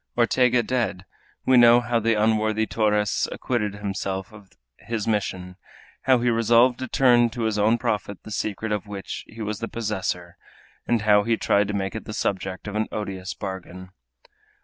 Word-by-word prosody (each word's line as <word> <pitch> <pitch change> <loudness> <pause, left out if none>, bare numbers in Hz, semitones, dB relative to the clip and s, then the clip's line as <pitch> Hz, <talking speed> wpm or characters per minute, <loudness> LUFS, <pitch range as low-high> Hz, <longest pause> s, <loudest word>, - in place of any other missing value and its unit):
Ortega 120 0 +3
dead, 115 -6 -2 0.4
we 130 -1 +5
know 120 0 +7
how 120 0 0
the 115 0 +1
unworthy 110 0 +1
Torres 105 -2 +1
acquitted 105 -5 -2
himself 95 -1 -4
of 100 -3 -14 0.3
his 115 -2 -4
mission, 95 -4 -2 0.5
how 130 -1 +5
he 120 0 +1
resolved 115 +2 +4
to 130 - -4
turn 120 -1 +4
to 115 +1 -5
his 110 -1 0
own 110 +3 +3
profit 105 -3 -3
the 110 - -10
secret 105 +1 -3
of 105 0 -2
which 100 -2 -6
he 110 0 -8
was 105 -1 -3
the 115 - -3
possessor, 95 -6 -4 0.5
and 115 -3 +1
how 105 -1 +5
he 115 +1 0
tried 100 0 +2
to 105 - -3
make 95 0 -2
it 110 - -6
the 105 - -6
subject 95 -1 -3
of 105 - -5
an 110 +1 0
odious 95 -2 -5
bargain. 95 -1 -7
105 Hz, 175 wpm, -24 LUFS, 100-115 Hz, 0.5 s, know